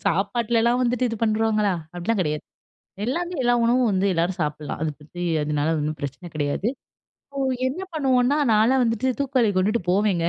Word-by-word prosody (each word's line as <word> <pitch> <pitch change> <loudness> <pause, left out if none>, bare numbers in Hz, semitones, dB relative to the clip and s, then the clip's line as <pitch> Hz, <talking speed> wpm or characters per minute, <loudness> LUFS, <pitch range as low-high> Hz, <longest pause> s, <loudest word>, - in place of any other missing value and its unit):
சாப்பாட்டுலலாம் 230 +5 +1
வந்துட்டு 250 0 +1
இது 230 - -3
பண்றோங்களா! 215 -2 +2 0.2
அப்பிடிலாம் 185 +5 -1
கிடையாது. 150 -2 -2 0.6
எல்லாமே 345 +8 -2
எல்லா 245 -1 +3
உணவும் 240 0 +3
வந்து 190 0 +1
எல்லாரும் 175 +2 -1
சாப்பிட்லாம். 150 -1 -3
அத 160 - 0
பத்தி 170 +4 -9 0.2
அதுனால 150 +1 0
ஒண்ணும் 150 +1 -2
பிரச்சன 145 +5 -6
கிடையாது. 145 +7 -1 0.6
இப்போ 275 - -5 0.3
என்ன 275 +9 -2
பண்ணுவோன்னா, 265 -2 +2
நான்லாம் 230 +5 +4
வந்துட்டு 230 +1 0
தூக்குவாளி 260 -5 +2
கொண்டுட்டு 205 +4 +2
போவேங்க 190 -2 +2
215 Hz, 150 wpm, -23 LUFS, 175-245 Hz, 0.6 s, நான்லாம்